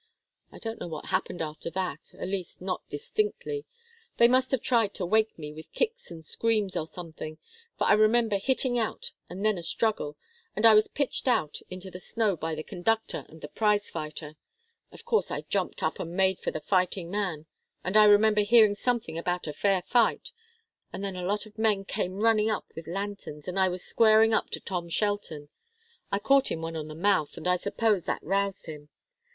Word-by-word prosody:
I - - -12
don't 225 0 -6
know - - -5
what 155 -3 -7
happened 185 -2 -1
after 155 +1 -5
that 180 -4 -4
at - - -4
least 190 -2 -4
not 185 0 -3
distinctly. 430 - -2 0.5
They 235 - +7
must 255 +1 +3
have 265 -4 0
tried 225 -5 +2
to 185 - -2
wake 220 +4 +2
me 150 -2 -7
with 155 +1 -11
kicks 475 0 -2
and 165 -2 -10
screams, 215 0 0
or 155 - -2
something, 160 -2 -8 0.4
for - - 0
I - - +5
remember 215 0 +3
hitting 255 +2 +1
out, 225 - -3 0.2
and 190 +4 -5
then 215 -4 +2
a - - -6
struggle, 170 -4 0 0.4
and 215 - +1
I 225 - +9
was 215 0 +5
pitched 280 -1 -2
out 155 - +1
into 185 +1 -8
the 180 - -8
snow 215 0 0
by 160 0 -3
the 155 - -5
conductor 220 +8 -1
and 160 0 -14
the - - -6
prize 210 +3 +1
fighter. 155 -1 -6 0.5
Of - - -13
course 450 - +2
I - - -3
jumped - - -2
up - - -1
and 170 0 -5
made 190 -1 +2
for - - -2
the 155 - -5
fighting 180 -1 0
man, 185 -7 -2 0.4
and 185 +3 -3
I 215 0 +8
remember 210 +1 +6
hearing 215 0 +6
something 220 -7 -1
about 175 +1 -2
a 150 - -4
fair 190 +3 +1
fight, 235 +2 +2 0.6
and 195 - -6
then 195 -2 -3
a 180 0 -3
lot 205 +2 -1
of 215 0 -15
men 210 -3 +2
came 190 +1 -3
running 220 -1 +4
up 215 - -1
with 165 - -8
lanterns, 195 -5 -5
and 185 +1 -2
I 190 -1 +4
was 180 0 -3
squaring 220 0 +5
up - - +1
to - - -4
Tom 175 -3 -4
Shelton. 170 -7 -1 0.6
I 200 - +2
caught 275 +6 +3
him 165 - -3
one 165 0 -4
on 155 -1 -4
the 155 - -8
mouth, 180 -3 +1
and - - -4
I 180 0 +3
suppose 200 -1 0
that - - -2
roused 195 +2 -1
him. 150 -2 -9
195 Hz, 205 wpm, -28 LUFS, 170-220 Hz, 0.6 s, I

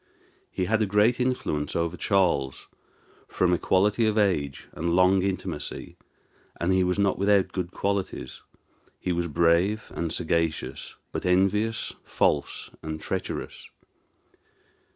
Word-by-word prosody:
He 95 - -2
had 110 +2 +1
great 105 +5 +3
influence 125 -13 -1
over 85 +1 0
Charles, 85 -9 +1 0.6
from 90 -1 +1
equality 105 +5 +2
of 110 0 0
age 80 -10 0
and 85 +1 -1
long 90 +1 +5
intimacy; 95 0 -4 0.6
and 90 +2 +1
he 95 0 +3
was 90 +1 0
not 100 -2 +1
without 100 -1 +3
good 90 -2 -3
qualities: 100 -9 -3 0.6
he 90 - -2
was 85 0 0
brave 85 +7 +2
and 85 -2 -2
sagacious, 80 -2 -2 0.2
but - - -4
envious, 100 +5 +1
false, - - 0
and 80 0 -5
treacherous. - - -5
95 Hz, 120 wpm, -26 LUFS, 85-100 Hz, 0.6 s, long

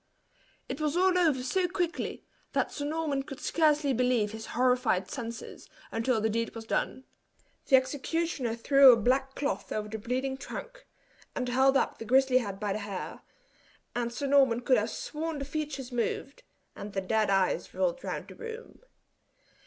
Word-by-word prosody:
It 285 - -5
was 305 +2 0
all 370 0 +4
over 310 -8 +3
so 365 +7 +1
quickly, 350 -1 -3 0.3
that - - +1
Sir 285 - -4
Norman 300 -2 -1
could 275 0 -9
scarcely 300 -3 +2
believe 245 -4 +2
his 220 0 -7
horrified 250 -7 +2
senses, 235 -3 -7 0.2
until 225 +1 +1
the 220 - +1
deed 230 +2 -2
was 225 -1 -7
done. 260 - -1 0.6
The 270 - +6
executioner 270 -1 0
threw 275 +3 +7
a 235 - +5
black 265 +4 +1
cloth 285 - -2
over 210 0 -2
the 220 +1 -5
bleeding 260 +4 -2
trunk, - - -8 0.5
and 250 - -2
held 265 +2 +4
up - - -1
the 225 - -6
grizzly 260 +2 +4
head 200 -5 -5
by 205 -2 -1
the 210 - -3
hair; 200 -3 -6 0.7
and 240 -1 -1
Sir 240 +4 -4
Norman 270 -4 +4
could 255 0 +4
have 215 +2 -2
sworn 315 +4 -4
the 275 - -4
features 285 -3 -4
moved, 245 - -2 0.3
and 205 0 -8
the 195 - -1
dead 215 +2 +1
eyes 195 -1 +1
rolled - - 0
round - - -4
the - - -9
room. 460 0 -9
260 Hz, 170 wpm, -29 LUFS, 230-295 Hz, 0.7 s, threw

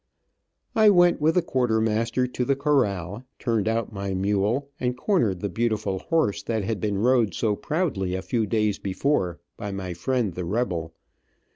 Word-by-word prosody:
I 220 -1 +6
went 175 -4 +4
with 160 +2 +3
the 180 - +3
quartermaster 115 -2 +1
to 125 0 -3
the 140 +2 +1
corral, 115 - 0
turned 115 -4 0
out 115 0 -1
my 100 -1 -3
mule, 105 +8 0
and 125 0 -1
cornered 115 - +1
the 100 - -1
beautiful 105 -2 -1
horse 160 - 0
that 110 -3 -2
had 105 +1 -2
been 105 -1 0
rode 120 0 +2
so 105 -3 +1
proudly 115 - -1
a 95 - -4
few 115 -3 0
days 105 -1 0
before 95 - -1 0.2
by 105 - -5
my 95 -2 -4
friend, 110 +3 -1
the 90 - -4
rebel. 85 -5 -2
110 Hz, 165 wpm, -25 LUFS, 100-130 Hz, 0.2 s, I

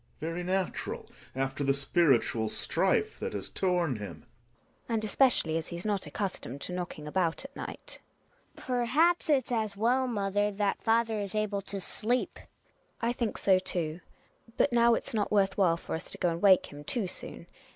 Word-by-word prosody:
Gregers 160 +2 -3
Very 175 +1 -3
natural 185 0 -2 0.3
after 135 +2 -1
the 135 0 +3
spiritual 140 -7 +2
strife - - +1
that - - -3
has 100 -2 -3
torn 175 - 0
him 95 -7 -7 0.7
GiNA. 235 - -3
And 220 - -1
especially 210 -8 +3
as 160 - -8
he's 175 +2 -7
not 205 -3 -1
accustomed 180 - -4
to 180 - -5
knocking 175 -4 -5
about 170 - 0
at 275 - -11
night - - -7 0.6
Hedvig. - - -12
Perhaps 265 +9 +2
it's 265 -5 +2
as 215 -4 -1
well, 250 +4 +2
mother, 205 -2 0
that 200 0 -1
father 225 -1 +2
is 200 0 -4
able 210 -2 0
to 200 0 -5
sleep. 235 +6 -1
GiNA. - - -17 0.5
I 235 +1 +1
think 235 -3 -2
so, 190 -2 +4
too. 170 -3 -3 0.6
But 285 - +3
now 235 0 +5
it's - - -4
not 210 -2 0
worth 195 -2 +3
while 175 -4 +3
for - - -7
us 160 - -4
to - - -8
go 180 - +1
and 165 0 -3
wake 190 -3 +6
him 145 0 -9
too 220 - -1
soon. 175 - -8
195 Hz, 185 wpm, -30 LUFS, 165-225 Hz, 0.7 s, wake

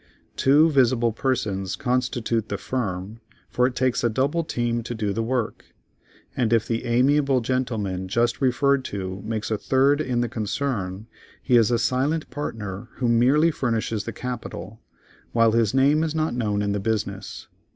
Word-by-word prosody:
Two 150 +4 +4
visible 120 -4 +3
persons 105 -6 -1
constitute 125 -4 -1
the 100 - -2
firm, 105 -4 -4 0.3
for 125 0 +3
it 125 - -5
takes 130 -1 +1
a 120 - +3
double 140 +8 0
team 120 -5 -1
to 120 +1 -5
do 105 -3 -1
the 115 - -1
work, 120 -1 -3 0.6
and 120 -3 0
if 115 -2 +3
the 115 +1 -2
amiable 135 +3 +3
gentleman 110 -7 -2
just 120 +7 0
referred 135 +1 +2
to 95 -1 -5
makes 110 0 -3
a 110 - 0
third 140 +3 +3
in 125 -4 0
the 120 - 0
concern, 110 -3 -3 0.4
he 125 - +3
is 115 -3 +5
a 120 - +2
silent 135 +7 0
partner 110 -6 -5
who 125 - -1
merely 130 +8 +4
furnishes 115 -6 -2
capital, 115 -4 -6 0.5
while 115 -1 +4
his 115 -2 +2
name 140 +4 +3
is 160 -1 -2
not 155 -2 0
known 105 -4 -1
in 100 - 0
the 100 - -1
business. 100 -1 -3
120 Hz, 160 wpm, -24 LUFS, 110-130 Hz, 0.6 s, is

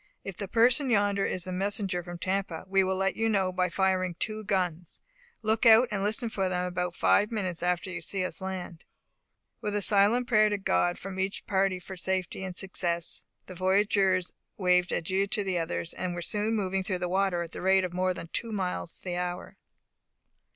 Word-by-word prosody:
If 195 - -6
the 200 +1 -5
person 245 +6 +3
yonder 200 -3 +2
is 180 - -2
a 185 - -5
messenger 195 -1 -1
from 175 0 -8
Tampa, 185 -2 -2
we 195 0 +3
will 190 0 0
let 195 +1 0
you 225 0 +1
know 195 -3 +1
by 180 0 0
firing 185 -1 +1
two 215 -1 -2
guns; 180 -4 -2 0.4
look 220 +1 +1
out, 230 +2 +7
and 200 -2 -1
listen 220 +4 0
for 195 -4 -1
them 180 0 -1
about 180 -1 -2
five 210 +1 +3
minutes 185 -6 -2
after 180 +1 0
you 180 -2 -5
see 185 +2 -2
us 185 - -5
land." 185 -3 -6 0.8
With 210 0 -2
a 205 - +1
silent 210 +5 +4
prayer 215 -3 +4
to 205 - 0
God 175 -2 +1
from 190 0 -7
each 190 +1 -2
party 190 -1 +1
for 190 +1 -9
safety 190 +1 -2
and 185 -1 -6
success, 175 -3 -2 0.2
the 185 - -9
voyagers 190 0 +2 0.2
waved 180 -2 +3
adieu 190 +4 0
to 205 +1 -1
the 185 -3 -1
others, 85 - -3
and 180 -1 -3
were 175 - -4
soon 210 +5 0
moving 195 -2 0
through 185 -1 -1
the 180 0 -2
water 185 -1 +1
at 165 - -9
the - - -7
rate 190 +1 +4
of 180 -1 -3
more 185 0 0
than 165 - -7
two 230 +5 -3
miles 185 -4 -3
the 175 -1 -3
hour. 180 0 -4
190 Hz, 200 wpm, -28 LUFS, 180-200 Hz, 0.8 s, out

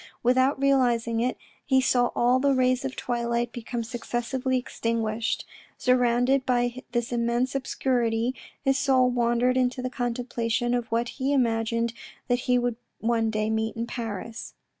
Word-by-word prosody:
Without 260 +3 +3
realising 245 -4 +2
it, 250 +2 0 0.3
he 265 -1 +3
saw 245 -1 +3
all 245 +2 +3
the 280 0 +3
rays 255 0 +2
of 270 - -1
the - - -12
twilight 235 0 -1
become 235 0 -4
successively 245 +2 -2
ex 250 - -7
tinguished. 225 -1 -1 0.3
Surrounded 250 +1 +3
by 245 0 0
this 240 -1 -1
immense 240 +2 0
obscurity, 245 -3 0 0.3
his 270 -1 +2
soul 260 -2 +3
wandered 240 +1 +2
into 255 0 +1
the 255 0 -3
contemplation 240 -1 -1
of 240 -1 -1
what 235 +1 +1
he 270 0 -2
imagined 230 -2 +1 0.4
that 245 0 +2
he 250 - +5
would 245 -2 -1 0.2
one 225 -1 +1
day 215 0 -1
meet 220 0 -1
in 230 +1 -2
Paris. 230 -1 -6
240 Hz, 155 wpm, -26 LUFS, 230-255 Hz, 0.4 s, he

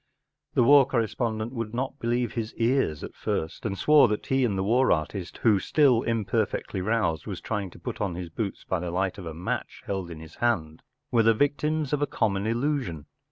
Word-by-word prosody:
The - - +5
war 140 +1 +7
corre¬ 115 -4 +1
spondent 110 -1 -2
would 115 -3 -4
not 135 +3 -3
believe 120 0 0
his 115 -2 -4
ears 115 - +1
at - - -7
first, 80 +7 -3
and 100 -2 -3
swore 150 +1 +6
that 105 -1 -2
he 135 0 +1
and 105 -6 +1
the 95 - 0
war 125 +6 +3
artist, 85 +3 -2
who, 105 -4 +5
still 130 +1 +3
imperfectly 110 -4 -1
roused, 105 -5 0
was 95 -4 -4
trying 105 -4 -3
to - - -15
put - - -6
on 95 -4 -1
his 90 -1 -5
boots 100 +4 -4
by 95 - -1
the 90 0 -4
light 95 +3 -1
of 90 - -7
a 80 - -5
match 85 - -4
held 95 -3 -3
in 80 -2 -8
his 80 0 -12
hand, 80 -10 0 0.3
were 115 - +4
the 115 0 +4
victims 150 +3 0
of 145 - +1
a 145 - +2
common 100 -1 0
illusion. 115 - -1
110 Hz, 210 wpm, -27 LUFS, 95-125 Hz, 0.3 s, war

